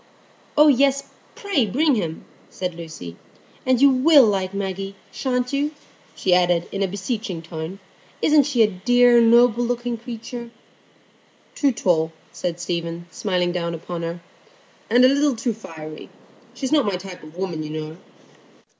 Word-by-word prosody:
"Oh 300 +1 +7
yes, 275 0 +3 0.3
pray 365 - 0
bring 290 - +2
him," 170 -8 -3 0.2
said 180 -1 -4
Lucy. 160 - -9 0.5
"And 255 -2 +3
you 280 +1 +6
will 275 +1 +6
like 190 -3 0
Maggie, 195 0 -4 0.2
sha'n't 250 -1 -2
you?" 290 +2 -1 0.4
she 185 - +1
added, 175 -1 +3
in 195 - -3
a 195 - +2
beseeching 195 -2 -4
tone. 160 +3 -6 0.4
"Isn't 300 -2 +4
she 250 -6 +3
a - - +4
dear, 240 +5 +4
noble 235 +1 +5
looking 240 0 -2
creature?" 235 +1 -7 1.0
"Too 285 -3 +2
tall," 165 -8 +1 0.2
said 175 -1 -4
Stephen, 170 -1 -4
smiling 180 0 -1
down 170 -1 -2
upon 170 +1 -6
her, 170 +1 -5 0.7
"and 245 +3 +6
a - - +8
little 280 0 +2
too 230 +1 -1
fiery. 155 -7 -10 0.5
She 275 - -4
is 260 - -2
not 290 -7 +3
my 200 - 0
type 180 0 -8
of 155 +2 -13
woman, 180 -4 -3
you 155 - -5
know." 155 +1 -6
200 Hz, 155 wpm, -22 LUFS, 175-250 Hz, 1.0 s, a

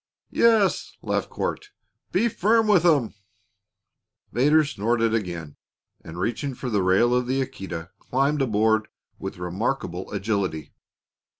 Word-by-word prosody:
"Yes," 220 -4 +2
laughed - - -1
Court; 415 - -4 0.4
"be 235 - +2
firm 225 +1 +2
with 205 -6 +4
'em!" 145 -10 +3 1.2
Vedder 150 +5 +4
snorted 115 -3 0
again 85 -8 -3 0.5
and, 80 +1 -9
reaching 120 +8 -2
for 125 0 -5
the 105 -2 +2
rail 95 +7 +3
of 125 0 +1
the 130 +2 0
Aquita, 90 -9 -5
climbed 140 +3 0
aboard 110 -2 +2 0.3
with - - -6
remarkable 90 +1 -3
agility. 100 -6 -2
115 Hz, 120 wpm, -24 LUFS, 95-145 Hz, 1.2 s, with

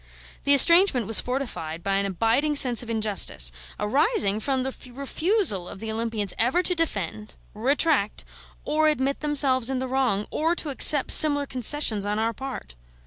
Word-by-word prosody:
The 280 - +3
estrangement 335 - +5
was 225 +1 +3
fortified 220 - -6
by 195 0 -1
an 200 0 -2
abiding 230 - -1
sense 250 -5 +5
of 240 - -10
injustice, 210 - +1 0.3
arising 215 - 0
from 265 +2 -3
the 265 0 -6 0.2
refusal 280 - -1
of - - -11
the 220 +1 -6
Olympians 220 -3 -3
ever 255 +11 0
to 360 - +2
defend, 215 - -5 0.2
retract, 265 0 -1 0.4
or 310 +1 0
admit 275 -2 -2
themselves 275 -4 +1
in 265 - -3
the 260 0 -4
wrong, 250 -6 -2
or 325 +3 -1
to 315 - -6
accept 280 +1 +4
similar 285 -2 +6
concessions 250 -4 -1
on 205 +1 -3
our 225 +1 -2
part. 265 - -9
255 Hz, 160 wpm, -23 LUFS, 210-290 Hz, 0.4 s, similar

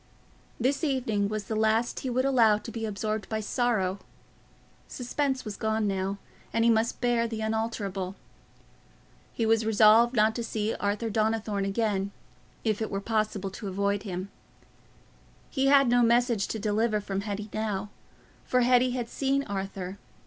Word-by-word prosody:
This 270 +6 0
evening 245 -8 0
was 215 -1 -3
the 220 - -4
last 220 +2 +1
he 260 - -4
would 255 +2 +1
allow 230 -6 +5
to 215 +2 -8
be 225 -1 -3
absorbed 215 0 -3
by 220 - -1
sorrow: 210 -4 0 0.9
suspense 265 +1 -2
was 210 -2 -5
gone 220 0 0
now, 195 0 -1 0.3
and 230 0 +2
he 235 - +6
must 225 +1 0
bear 240 -1 +2
the 225 -1 -5
unalterable. 215 -4 -2 1.2
He 230 - -1
was 225 0 +3
resolved 220 +3 +5
not 215 0 +4
to 235 - -2
see 220 -1 -2
Arthur 210 +3 -2
Donnithorne 215 -2 0
again, 200 -1 0 0.5
if 215 -1 0
it 220 - -1
were 195 - -2
possible 215 -2 -1
to 205 +2 -7
avoid 200 +1 0
him. 190 -1 -5 1.2
He 270 -1 +1
had 275 -1 +6
no 245 0 +4
message 235 -3 +3
to - - -3
deliver 215 +1 +1
from 195 -1 -3
Hetty 205 0 -5
now, 210 -2 -2 0.5
for 250 - +2
Hetty 250 0 +4
had 240 -2 -3
seen 275 +2 0
Arthur. 195 -2 -5
220 Hz, 155 wpm, -28 LUFS, 205-235 Hz, 1.2 s, he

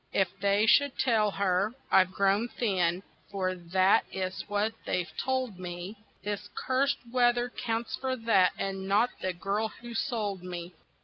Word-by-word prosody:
If 190 -3 +2
they 200 +2 +3
should 285 +4 +4
tell 220 -5 +3
her 195 +3 0 0.2
I've 185 -1 +5
grown 200 +4 +2
thin 185 -7 0 0.3
(for 185 -2 -1
that 185 +2 +3
is 185 -1 -3
what 205 +2 0
they've 175 -3 -2
told 260 -7 -1
me) 180 +3 -6 0.3
This 205 0 -4
cursed 275 +2 +1 0.2
weather 240 -1 +3
counts 230 -1 -3
for 260 -1 -1
that, 225 -6 +3
and 195 -1 -3
not 210 +5 +3
the 185 - 0
girl 200 +5 -1
who 235 +2 -10
sold 215 -6 -2
me. 175 -1 -7
200 Hz, 150 wpm, -29 LUFS, 185-235 Hz, 0.3 s, I've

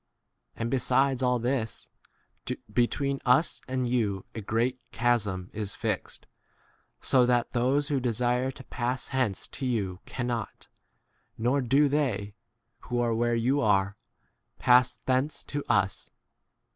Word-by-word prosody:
And 115 0 -3
be 135 - +2
sides 135 +1 +2
all 125 -1 +2
this, 120 -1 -2 0.9
between 135 +4 +1
us 130 +6 +3
and 130 -1 -1
you 110 -6 0
a 110 - -5
great 115 +5 0
chasm 105 -6 0
is 105 -2 -3
fixed, - - -3 0.8
so 125 -2 +4
that 120 -1 +1
those 135 +5 +1
who 140 -2 +1
desire 125 +1 +1
to 130 0 -9
pass 125 +1 -3
hence 130 -8 -1
to 135 - -5
you 100 -7 -1
cannot, 120 -3 -4 0.7
nor 125 +5 +1
do 135 +4 +4
they 125 -9 -1 0.5
[who 120 0 -3
are 120 -1 +1
where 120 +1 +1
you 130 +5 +2
are] 100 -3 +2 0.6
pass 125 0 +4
thence 130 +3 0
to 145 -1 -4
us. 100 -4 +1
125 Hz, 135 wpm, -28 LUFS, 115-130 Hz, 0.9 s, so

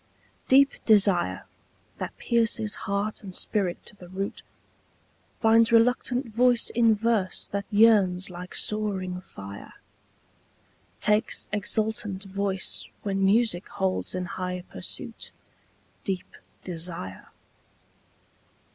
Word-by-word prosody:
DEEP 275 +1 +4
desire, 200 -5 +4 0.5
that - - -5
pierces 225 -2 +1 0.2
heart 200 +2 -1
and 190 -4 -9
spirit 190 -5 -2
to - - -8
the 180 -3 -13
root, 195 +2 -4 1.0
Finds 225 0 +5
reluctant 245 +2 +3
voice 245 +1 +3
in 230 -2 +4
verse 215 -3 0
that 200 0 -3
yearns 205 -4 +4
like 180 +1 -8
soaring 190 -4 -1
fire, 100 - -10 1.3
Takes 210 +2 +2
exultant 210 -1 -1
voice 195 -1 -2 0.2
when 195 -1 0
music 200 -2 +2
holds 190 -1 -2
in 185 0 -2
high 180 0 -4
pursuit - - -5 0.7
Deep 190 -2 -4 0.3
desire. 165 - -4
200 Hz, 100 wpm, -26 LUFS, 185-225 Hz, 1.3 s, Finds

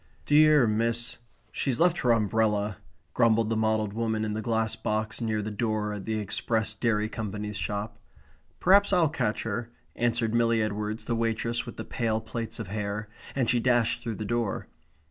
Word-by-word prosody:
"Dear, 150 -2 +6
miss, 115 +2 0 0.3
she's 130 -4 -1
left 175 0 +3
her 125 - +3
umbrella," 105 -2 +1 0.4
grumbled 115 -1 +3
the - - +1
mottled 110 -2 +1
woman 110 -1 -1
in 105 - -2
the 110 - -2
glass 110 0 0
box 110 0 -2
near 110 -2 -1
the 110 - -4
door 105 -1 -1
at 100 -2 -6
the 110 -1 -1
Express 110 +2 0
Dairy 110 -2 0
Company's 105 -1 -5
shop. 105 +1 -3 0.6
"Perhaps 200 +2 +5
I'll 170 -4 +4
catch 110 -8 -1
her," 115 +2 -3 0.3
answered 115 -1 0
Milly 115 -1 +3
Edwards, 105 +1 -3
the 120 - -1
waitress 115 +1 -1
with 120 - -8
the - - -5
pale 110 -2 -1
plaits 110 +1 -5
of - - -5
hair; 105 +1 -3 0.3
and 130 -3 +1
she 120 - +3
dashed 120 -1 +2
through 115 -3 -4
the 110 - -5
door. 120 -1 -1
110 Hz, 175 wpm, -27 LUFS, 105-120 Hz, 0.6 s, Dear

